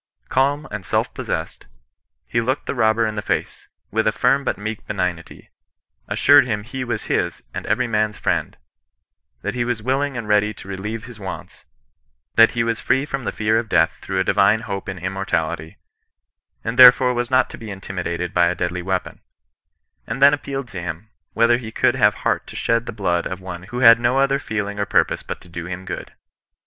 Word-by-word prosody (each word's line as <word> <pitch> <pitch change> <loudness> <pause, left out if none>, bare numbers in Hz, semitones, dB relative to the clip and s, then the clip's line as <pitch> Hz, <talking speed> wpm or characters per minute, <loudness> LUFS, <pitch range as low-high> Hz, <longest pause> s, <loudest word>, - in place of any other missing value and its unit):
Calm 140 +3 +1
and 100 -2 -5
self - - -1
possessed, - - -5 0.6
he 115 - 0
looked 130 +5 -1
the - - -2
robber 115 -2 +2
in 110 - -2
the 105 - -3
face, - - -3 0.2
with 110 +1 +1
a - - +4
firm 130 +5 +2
but - - -1
meek 110 +1 -5
benignity, 90 -4 -4 0.6
as - - -2
sured 145 -2 +6
him 105 -3 -2
he 130 +3 -5
was 120 - -3
his - - -1
and - - -5
every 120 +4 +1
man's 110 -2 0
friend, - - -1 0.9
that 105 - -2
he 125 -1 -1
was 120 -3 -2
willing 135 +2 0
and 115 -3 -5
ready 105 0 +2
to - - -12
relieve 105 +3 -5
his 120 -3 -12
wants, 95 -2 -8 0.7
that 115 0 +6
he 115 - +1
was 115 -1 -1
free 135 +3 +1
from 135 -4 -4
the - - -1
fear 110 +1 +1
of 115 -1 -5
death 80 - +3
through 95 -1 -2
a - - +3
divine 100 +3 +3
hope 100 -4 -5
in 95 - -5
immortality, 85 -4 -3 0.9
and 115 +2 -3
therefore 125 0 +8
was 120 0 -2
not 130 0 +3
to - - -8
be 110 - -8
intimidated 90 -3 -4
by 85 -1 +4
a 90 - 0
deadly 90 +1 -2
weapon; 95 +1 -3 0.9
and - - -4
then 140 +1 +7
appealed 140 -2 -4
to 95 -7 -7
him, 90 +6 -6 0.2
whether 115 +1 +4
he 110 -3 -8
could 120 - +2
have 105 -6 +3
heart - - -1
to - - -10
shed 115 +1 0
the - - -3
blood 90 -6 -1
of 90 - -6
one 90 -1 -8
who 125 +1 -4
had 115 -1 +8
no 120 +2 +1
other 135 0 +2
feeling 105 -4 -4
or 100 - +1
purpose - - +2
but - - -6
to - - -17
do 85 0 -7
him 90 +1 -6
good. - - -6
110 Hz, 205 wpm, -21 LUFS, 95-125 Hz, 0.9 s, therefore